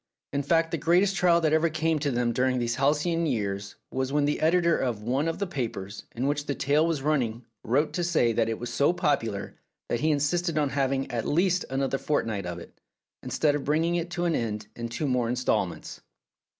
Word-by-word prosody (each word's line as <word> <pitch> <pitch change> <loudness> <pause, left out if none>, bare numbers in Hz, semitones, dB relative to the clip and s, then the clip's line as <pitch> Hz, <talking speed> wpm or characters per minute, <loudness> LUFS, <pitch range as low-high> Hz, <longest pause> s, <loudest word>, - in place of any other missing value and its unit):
In 140 - +1
fact, 165 +3 +2
the 165 - -1
great 175 +5 +4
est 195 -1 0
trial 175 -3 +4
that 155 -1 +2
ever 160 +1 +3
came 160 0 0
to 145 0 0
them 120 -2 0
during 130 +1 +1
these 120 -1 0
halcyon 155 +5 +1
years 100 -6 -2 0.2
was 130 0 -2
when 145 0 +2
the 145 - -1
editor 170 +1 +3
of 120 -5 -2
one 130 +7 0
of 165 - -2
the 200 - -1
papers 110 - -5
in 125 +3 -1
which 145 +1 -1
the 140 - -1
tale 150 +4 +2
was 155 -5 -1
running 125 -6 0 0.2
wrote 130 +6 +1
to 175 - -1
say 155 -9 +2
that 115 0 +1
it 115 - -2
was 120 0 -6
so 145 +5 +3
popular 125 - -1 0.3
that 120 - 0
he 155 - +1
insisted 155 +3 +1
on 145 -2 +2
having 135 -1 -1
at 115 -2 -2
least 180 +3 +2
another 135 +1 -1
fortnight 110 -10 -1
of 90 0 -4
it, 85 - -13 0.4
instead 150 -2 +1
of 145 -1 -2
bringing 160 +4 +1
it 170 0 -1
to 175 0 -2
an 170 - +2
end 110 -5 -2
in 115 0 -5
two 120 +6 -2
more 125 -3 +1
instalments. 125 +1 -1
145 Hz, 215 wpm, -27 LUFS, 120-165 Hz, 0.4 s, great